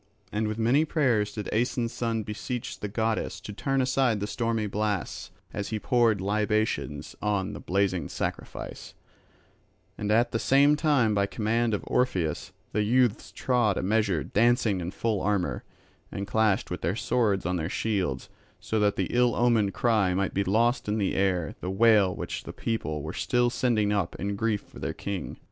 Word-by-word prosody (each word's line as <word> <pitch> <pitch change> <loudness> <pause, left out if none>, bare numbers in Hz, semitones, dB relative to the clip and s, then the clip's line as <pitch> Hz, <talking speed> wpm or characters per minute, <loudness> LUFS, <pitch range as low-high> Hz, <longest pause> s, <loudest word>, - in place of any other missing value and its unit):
And 105 +1 -1
with 110 0 -3
many 120 +7 +3
prayers 125 -10 +1
did 105 -2 -5
Aeson's 120 +1 0
son 115 -2 -1
beseech 115 +3 -5
the 105 - -3
goddess 110 +2 -1
to 105 - -7
turn 135 +5 0
aside 130 -4 +2
the 100 - -2
stormy 115 0 -1
blasts 105 -2 -2 0.2
as 100 - -3
he 110 - -2
poured 115 -2 +2
libations 100 - -1
on 100 -2 -1
the - - -7
blazing 95 -4 0
sacrifice; - - -5 1.0
and 105 0 -1
at 115 +3 +3
the 115 - -1
same 140 +4 +4
time 145 -8 +2
by 100 -1 +2
command 115 +1 0
of - - -5
Orpheus 90 -11 0 0.2
the 105 - +1
youths 120 +1 +2
trod 120 -6 +1
a - - -1
measure 100 -5 +1
dancing 115 -3 +2
in 85 - -3
full 105 +1 -1
armour, 100 -3 0 0.5
and 100 - -4
clashed 105 -3 +1
with 90 - -4
their 90 - 0
swords 110 -6 +1
on 90 +1 0
their 80 0 -2
shields, 95 -12 -1 0.3
so 110 - -1
that 105 -1 +2
the 95 - 0
ill 120 -1 +3
omened 115 -5 +2
cry 105 -6 +2
might 95 0 0
be 100 - +1
lost 115 +6 +1
in 105 +1 0
the 100 -3 0
air 90 -5 0
the 90 - -3
wail 100 -2 +4
which - - -5
the - - -7
people 80 -10 -3
were 80 +2 -5
still 120 -1 +1
sending 110 -5 +1
up 100 -5 -1
in 100 +2 -3
grief 110 0 0
for - - -14
their - - -3
king. 100 -2 -5
105 Hz, 180 wpm, -27 LUFS, 100-115 Hz, 1.0 s, same